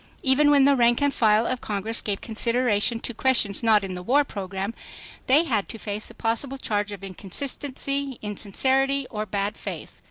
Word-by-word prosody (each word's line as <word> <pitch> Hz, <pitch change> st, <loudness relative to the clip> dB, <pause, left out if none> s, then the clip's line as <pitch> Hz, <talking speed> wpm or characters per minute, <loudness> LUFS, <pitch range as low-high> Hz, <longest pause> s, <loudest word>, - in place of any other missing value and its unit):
Even 285 Hz, +2 st, +4 dB
when 285 Hz, -2 st, +5 dB
the 280 Hz, +1 st, +5 dB
rank 240 Hz, -1 st, +3 dB
and 285 Hz, -1 st, +1 dB
file 220 Hz, 0 st, +3 dB
of 255 Hz, 0 st, -2 dB
Congress 215 Hz, +2 st, -2 dB
gave 200 Hz, -2 st, -3 dB
consideration 230 Hz, -1 st, +1 dB
to 240 Hz, -, -4 dB
questions 225 Hz, -4 st, +2 dB
not 220 Hz, -3 st, +4 dB
in 190 Hz, -1 st, -4 dB
the 180 Hz, -, -6 dB
war 270 Hz, +10 st, +3 dB
program, 195 Hz, -3 st, -5 dB, 0.5 s
they 285 Hz, +5 st, +5 dB
had 225 Hz, -, -1 dB
to 225 Hz, -, -7 dB
face 210 Hz, 0 st, -4 dB
a -, -, -14 dB
possible 240 Hz, +4 st, -1 dB
charge 210 Hz, -5 st, -2 dB
of 200 Hz, -2 st, -8 dB
inconsistency, 275 Hz, -, -3 dB
insincerity 265 Hz, +7 st, 0 dB
or 215 Hz, -1 st, -4 dB
bad 200 Hz, +1 st, -2 dB
faith. -, -, -8 dB
230 Hz, 180 wpm, -24 LUFS, 205-270 Hz, 0.5 s, when